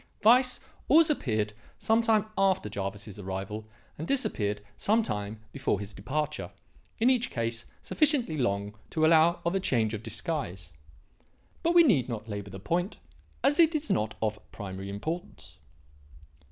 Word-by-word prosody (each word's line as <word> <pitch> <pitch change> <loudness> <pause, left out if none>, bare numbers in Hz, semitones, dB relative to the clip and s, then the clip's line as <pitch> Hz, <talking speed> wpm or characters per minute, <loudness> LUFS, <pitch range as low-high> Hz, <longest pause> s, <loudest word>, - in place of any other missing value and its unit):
Weiss 250 +3 +5 0.3
always 315 +2 +6
appeared 110 - -1 0.2
some 225 +1 +2
time 220 -2 +3
after 190 - +2
Jervis's 100 +1 -5
arrival 100 +3 -5 0.3
and 160 - -4
disappeared 105 - -1
some 220 - +2
time 105 - -4
before 135 -8 -1
his 100 +1 -7
departure, 135 -2 -3 0.5
in 240 +3 +4
each 245 -1 +1
case 115 0 -1 0.2
sufficiently 285 - +2
long 100 -6 -1 0.2
to 155 -1 +2
allow 165 +2 +5
of 170 - +1
a 195 - +2
change 115 - +1
of 110 - -4
disguise. 115 - -3 0.9
But 335 +1 +1
we 340 - +9
need 150 - +3
not 110 -2 -5
labour 100 -2 -5
the 95 0 -8
point, 175 - -1 0.5
as 290 +3 +3
it 330 -1 +6
is 310 0 -1
not 110 0 0
of 105 -1 -1
primary 95 -1 -6
importance. 135 - -6
120 Hz, 150 wpm, -29 LUFS, -, 0.9 s, we